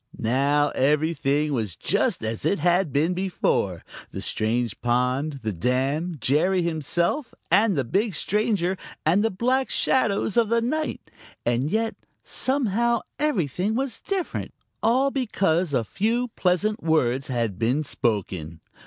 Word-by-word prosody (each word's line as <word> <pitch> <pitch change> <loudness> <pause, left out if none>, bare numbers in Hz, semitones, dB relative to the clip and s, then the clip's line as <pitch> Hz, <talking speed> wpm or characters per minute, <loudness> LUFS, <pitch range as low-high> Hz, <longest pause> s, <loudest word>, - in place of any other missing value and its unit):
Now 140 +5 +2
everything 150 +1 +1
was 110 -9 -2
just - - 0
as 110 0 -3
it 200 - +2
had 175 0 +2
been 155 +6 +1
before 175 - -1 0.3
the - - -7
strange 115 0 -1
pond, 125 +4 0
the 110 -1 -2
dam, 135 - -1
Jerry 175 +9 +2
himself 170 - 0 0.2
and 205 -1 +4
the 135 - +2
big 195 - 0
stranger, 200 0 0 0.3
and 180 +7 +3
the 225 - +2
black 255 +7 0
shadows 215 -3 +1
of 230 -3 +3
the 230 0 +3
night 305 +7 -3 0.3
and 120 +4 +1
yet 225 +3 0 0.3
somehow, 235 -3 0 0.2
everything 205 - 0
was 265 0 -2
different, 385 -3 -3 0.3
all 260 +5 +3
because 190 - 0
a 125 -4 +1
few 230 - -1
pleasant 210 +2 0
words 135 -5 +1
had 115 -7 -2
been 125 +7 +1
spoken. 95 - -2
170 Hz, 135 wpm, -24 LUFS, 130-220 Hz, 0.3 s, and